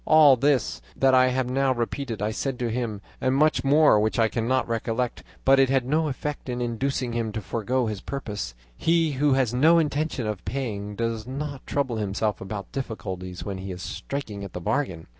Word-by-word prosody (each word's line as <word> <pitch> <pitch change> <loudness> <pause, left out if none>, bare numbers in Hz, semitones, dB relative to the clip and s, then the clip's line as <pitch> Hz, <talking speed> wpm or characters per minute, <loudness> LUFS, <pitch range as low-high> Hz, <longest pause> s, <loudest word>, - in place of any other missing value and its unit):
"All 155 -3 +7
this 135 -1 +1
that 135 -1 +3
I 130 0 +6
have 130 0 0
now 135 +1 +2
repeated 120 -2 -3
I 105 - 0
said 135 +3 -2
to 120 -2 -2
him, 110 -4 -3 0.2
and 130 +1 +2
much 155 +2 +3
more 145 -4 +5
which 110 +1 0
I 115 -1 +3
cannot 125 +3 0
recollect; 115 +1 -2 0.2
but 135 0 +6
it 135 -1 +5
had 135 -2 +2
no 155 +4 +1
effect 145 0 -4
in 125 0 -2
inducing 125 +1 -1
him 115 -2 -1
to 110 - -2
forego 115 +5 -1
his 105 -4 -3
purpose; 105 - -5 0.2
he 165 - +2
who 140 +1 +2
has 130 -3 +2
no 155 +7 +5
intention 150 -5 0
of 105 -3 -3
paying 105 -6 -4
does 115 0 -2
not 140 +1 -5
trouble 130 -5 -1
himself 105 0 -1
about 100 -1 -6
difficulties 95 -8 -5
when 95 -2 -4
he 95 0 -5
is 90 0 -7
striking 130 -8 -5
the 100 -3 -6
bargain. 95 - -1
125 Hz, 195 wpm, -25 LUFS, 110-135 Hz, 0.2 s, All